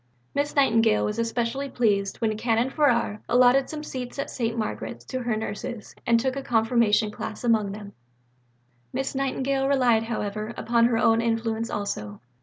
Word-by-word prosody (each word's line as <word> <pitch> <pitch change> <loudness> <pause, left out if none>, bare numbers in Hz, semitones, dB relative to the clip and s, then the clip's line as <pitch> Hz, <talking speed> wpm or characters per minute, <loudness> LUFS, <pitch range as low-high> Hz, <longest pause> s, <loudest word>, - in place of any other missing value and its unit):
Miss 285 +1 -1
Nightingale 225 -6 +3
was 210 +2 -2
especially 235 +4 -1
pleased 200 -6 +1
when 220 -2 0
Canon 230 +3 +1
Farrar 240 -8 +1
allotted 250 +2 +4
some 305 -1 -5
seats 255 -3 -6
at 280 - -3
St. 230 -2 -2
Margaret's 215 -2 -4
to 260 - -4
her 235 -3 -1
nurses 220 +1 -5
and 235 -1 +5
took 260 +2 -1
a 275 - -3
Confirmation 225 -3 +2
class 215 +2 -6
among 220 -4 +2
them. 205 +1 -7
II 200 - -11 1.0
Miss 270 0 -2
Nightingale 270 0 0
relied, 245 -5 +3
however, 215 0 -4
upon 235 0 +2
her 235 -1 +2
own 230 0 +3
influence 225 0 -1
also. 105 - -4
230 Hz, 165 wpm, -25 LUFS, 220-255 Hz, 1.0 s, and